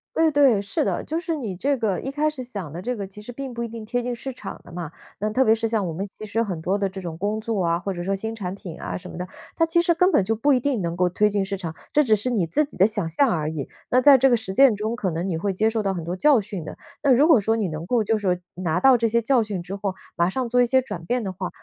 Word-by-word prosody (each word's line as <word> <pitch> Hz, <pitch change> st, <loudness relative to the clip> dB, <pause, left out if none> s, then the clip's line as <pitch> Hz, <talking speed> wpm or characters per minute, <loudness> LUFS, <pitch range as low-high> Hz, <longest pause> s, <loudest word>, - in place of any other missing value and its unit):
对 325 Hz, 0 st, +4 dB
对， 275 Hz, -8 st, +4 dB
是 200 Hz, -, -1 dB
的。 190 Hz, -3 st, -1 dB
就 320 Hz, +2 st, -2 dB
是 335 Hz, -1 st, -2 dB
你 225 Hz, -11 st, -4 dB
这 275 Hz, +10 st, 0 dB
个 220 Hz, -7 st, -1 dB
一 270 Hz, -, -4 dB
开 300 Hz, +2 st, +1 dB
始 285 Hz, -4 st, -6 dB
想 200 Hz, -, -6 dB
的 165 Hz, -, -6 dB
这 250 Hz, +1 st, -2 dB
个 200 Hz, -3 st, -5 dB
其 195 Hz, +2 st, -11 dB
实 215 Hz, -, -9 dB
并 270 Hz, +2 st, -6 dB
不 235 Hz, -1 st, -4 dB
一 -, -, -3 dB
定 230 Hz, -1 st, -8 dB
贴 245 Hz, +3 st, -2 dB
近 245 Hz, 0 st, -2 dB
市 265 Hz, +3 st, -6 dB
场 250 Hz, -, -8 dB
的 -, -, -14 dB
嘛， 170 Hz, -3 st, -6 dB, 0.3 s
那 210 Hz, -, -1 dB
特 260 Hz, +4 st, +3 dB
别 220 Hz, -3 st, +4 dB
是 225 Hz, 0 st, -1 dB
像 220 Hz, -5 st, 0 dB
我 -, -, -3 dB
们 180 Hz, +5 st, -4 dB
其 205 Hz, +2 st, -13 dB
实 220 Hz, +2 st, 0 dB
很 180 Hz, -7 st, -4 dB
多 190 Hz, +4 st, 0 dB
的 200 Hz, -1 st, 0 dB
这 190 Hz, 0 st, -7 dB
种 170 Hz, -3 st, -6 dB
工 205 Hz, +4 st, -2 dB
作 215 Hz, -4 st, -1 dB
啊， 170 Hz, 0 st, +1 dB
或 195 Hz, +3 st, -3 dB
者 175 Hz, -2 st, -4 dB
说 195 Hz, +2 st, -1 dB
新 220 Hz, +3 st, -3 dB
产 185 Hz, -4 st, -4 dB
品 180 Hz, -4 st, -9 dB
啊 -, -, -4 dB
什 -, -, -7 dB
么 -, -, -9 dB
的， 180 Hz, 0 st, -4 dB, 0.3 s
它 330 Hz, -, +3 dB
其 335 Hz, +1 st, +3 dB
实 340 Hz, -, +2 dB
根 360 Hz, +3 st, +4 dB
本 -, -, +4 dB
就 220 Hz, +4 st, 0 dB
不 280 Hz, +6 st, +3 dB
一 255 Hz, -, +3 dB
定 250 Hz, -6 st, -1 dB
能 170 Hz, 0 st, -2 dB
够 180 Hz, 0 st, +2 dB
推 210 Hz, +4 st, +2 dB
进 200 Hz, -1 st, +1 dB
市 195 Hz, +1 st, -3 dB
场， 165 Hz, -4 st, -6 dB, 0.2 s
这 300 Hz, -, +4 dB
只 220 Hz, -5 st, +4 dB
是 215 Hz, +5 st, -1 dB
你 215 Hz, -8 st, +1 dB
自 230 Hz, -, +1 dB
己 285 Hz, -, -10 dB
的 190 Hz, -, +6 dB
想 205 Hz, -6 st, -1 dB
象 220 Hz, -, +3 dB
而 155 Hz, -4 st, -1 dB
已， 150 Hz, -4 st, -4 dB, 0.2 s
那 250 Hz, -, +4 dB
在 280 Hz, +1 st, +8 dB
这 270 Hz, +2 st, +5 dB
个 240 Hz, -, +4 dB
实 190 Hz, -3 st, -4 dB
践 265 Hz, +1 st, +6 dB
中 215 Hz, +3 st, -2 dB
可 200 Hz, -5 st, -1 dB
能 170 Hz, +2 st, -3 dB
你 180 Hz, -, -1 dB
会 195 Hz, +5 st, -1 dB
接 210 Hz, +4 st, +1 dB
受 225 Hz, 0 st, 0 dB
到 195 Hz, -2 st, -1 dB
很 170 Hz, -, -4 dB
多 170 Hz, +2 st, -3 dB
教 275 Hz, +6 st, +4 dB
训 195 Hz, -4 st, -6 dB
的， -, -, -8 dB, 0.2 s
那 280 Hz, -, +3 dB
如 275 Hz, +5 st, +5 dB
果 300 Hz, -10 st, +6 dB
说 220 Hz, +3 st, +1 dB
你 215 Hz, -4 st, 0 dB
能 155 Hz, 0 st, -5 dB
够 240 Hz, -3 st, +2 dB
就 220 Hz, +2 st, +1 dB
是 190 Hz, -4 st, 0 dB, 0.2 s
拿 180 Hz, -2 st, -1 dB
到 265 Hz, +5 st, +6 dB
这 230 Hz, -1 st, +2 dB
些 230 Hz, +1 st, +2 dB
教 240 Hz, +2 st, +2 dB
训 205 Hz, -5 st, -4 dB
之 190 Hz, +2 st, -6 dB
后， 195 Hz, -1 st, -3 dB, 0.2 s
马 170 Hz, +1 st, +2 dB
上 255 Hz, +5 st, -2 dB
做 245 Hz, +1 st, +3 dB
一 -, -, +5 dB
些 260 Hz, +2 st, +4 dB
转 215 Hz, -10 st, -6 dB
变 245 Hz, +6 st, 0 dB
的 190 Hz, -2 st, -4 dB
话， 185 Hz, 0 st, -4 dB
215 Hz, 350 characters per minute, -23 LUFS, 185-250 Hz, 0.3 s, 在